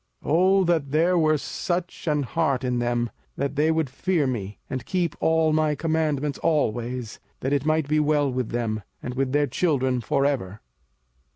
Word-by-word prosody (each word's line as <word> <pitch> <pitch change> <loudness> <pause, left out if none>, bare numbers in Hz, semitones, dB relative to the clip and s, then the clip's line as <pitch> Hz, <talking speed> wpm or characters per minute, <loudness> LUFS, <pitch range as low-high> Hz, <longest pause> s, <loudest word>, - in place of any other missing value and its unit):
05:005:029 - - -3
O 190 +3 +4
that 165 -5 +1
there 165 +5 +3
were 155 -2 +3
such 175 +4 -4
an 150 -2 +2
heart 135 -1 0
in 125 -1 0
them, 120 -1 0 0.3
that 140 +1 -2
they 150 +2 +2
would 160 -2 +1
fear 155 +4 0
me, 105 -6 -3
and 130 -2 -5
keep 180 -4 0
all 160 -1 +3
my 155 -1 +2
commandments 150 -2 -1
always, 120 -6 -1 0.2
that 135 +2 0
it 145 +1 0
might 155 -2 +2
be 155 +1 +2
well 150 -2 +2
with 125 -2 -2
them, 115 -2 -2 0.2
and 125 - -4
with 130 0 -1
their 145 +1 +3
children 130 -3 0
for 140 +5 +1
ever! 110 -8 -1
145 Hz, 180 wpm, -25 LUFS, 125-160 Hz, 0.3 s, O